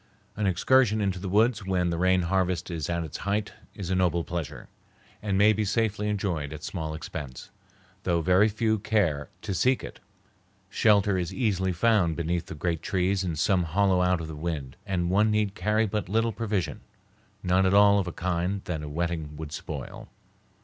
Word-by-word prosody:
An 105 -1 0
excursion 110 +4 +3
into 95 -3 -1
the 95 0 -5
woods 110 +2 +2
when 90 -2 0
the 85 - -2
rain 95 0 +3
harvest 90 0 0
is 80 -2 -3
at 85 -1 -1
its 80 - -6
height 100 +2 -2 0.2
is 95 -3 -5
a - - +2
noble 90 -2 +1
pleasure, 85 -3 -5 0.5
and 100 -2 -1
may 105 +2 +6
be 110 +1 -1
safely 105 0 0
enjoyed 90 -8 -2
at 75 0 -8
small 80 -4 -4
expense, 75 -4 -7 0.5
though 85 -1 +1
very 90 +6 +4
few 110 0 0
care 100 -9 0
to 100 - -3
seek 130 +8 +2
it. - - -9 0.7
Shelter 100 -3 +3
is 85 -2 -3
easily 95 -7 0
found 90 -2 +2
beneath 85 +1 -2
the - - -7
great 80 +1 -2
trees 95 +1 0
in 85 -3 -2
some 90 +5 +2
hollow 90 +2 +2
out 90 -1 +2
of 80 - -5
the 80 - -7
wind, 75 -4 -4
and 90 -2 -1
one 105 +3 +3
need 105 -2 +1
carry 105 +3 +1
but 105 -3 -3
little 115 +2 +1
provision, 105 -5 -2 0.6
none 95 +1 +3
at 95 - +2
all 100 0 +6
of 95 - -2
a - - -3
kind 90 +3 -2
that 80 -4 -3
a 75 - -6
wetting 80 -1 -3
would 80 -1 -7
spoil. - - -7
95 Hz, 190 wpm, -27 LUFS, 85-105 Hz, 0.7 s, may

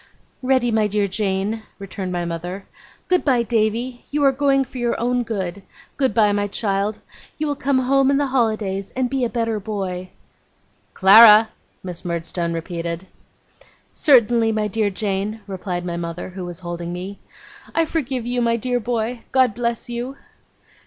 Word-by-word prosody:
'Ready, 255 -2 +2
my 220 -1 +2
dear 205 0 0
Jane,' 200 +2 -1 0.2
returned 195 -1 -6
my 175 -1 -2
mother. 175 +3 -5 0.4
'Good 365 -1 +2
bye, 250 -5 +3
Davy. 235 +2 -1
You 290 0 0
are 275 - +6
going 275 0 +2
for 255 0 -9
your 240 -1 0
own 245 +1 +1
good. 200 -5 -4 0.3
Good 265 -4 +1
bye, 210 -2 +4
my 205 0 0
child. 205 0 -1 0.4
You 310 - -1
will 290 -1 -1
come 280 -1 +1
home 270 +1 +3
in 280 - +3
the 285 - +2
holidays, 215 -6 0
and 255 -1 0
be 270 -2 0
a 240 - +1
better 230 -2 -1
boy.' 190 -3 -4 0.9
'Clara!' 215 +3 +8 0.3
Miss 180 -2 -6
Murdstone 170 0 -3
repeated. 170 +1 -4 0.9
'Certainly, 235 -6 +4
my 215 -1 0
dear 210 0 0
Jane,' 200 +2 -3
replied 185 -2 -4
my 170 -1 -3
mother, 170 +1 -5
who 185 0 -7
was 175 0 -8
holding 175 -1 -5
me. 185 +3 -6 0.6
'I 330 - +3
forgive 265 -7 -2
you, 245 0 -1
my 230 -1 +2
dear 245 +2 -1
boy. 235 0 -2
God 260 -4 +3
bless 235 +1 -2
you! 245 +3 -5
220 Hz, 165 wpm, -21 LUFS, 190-245 Hz, 0.9 s, Clara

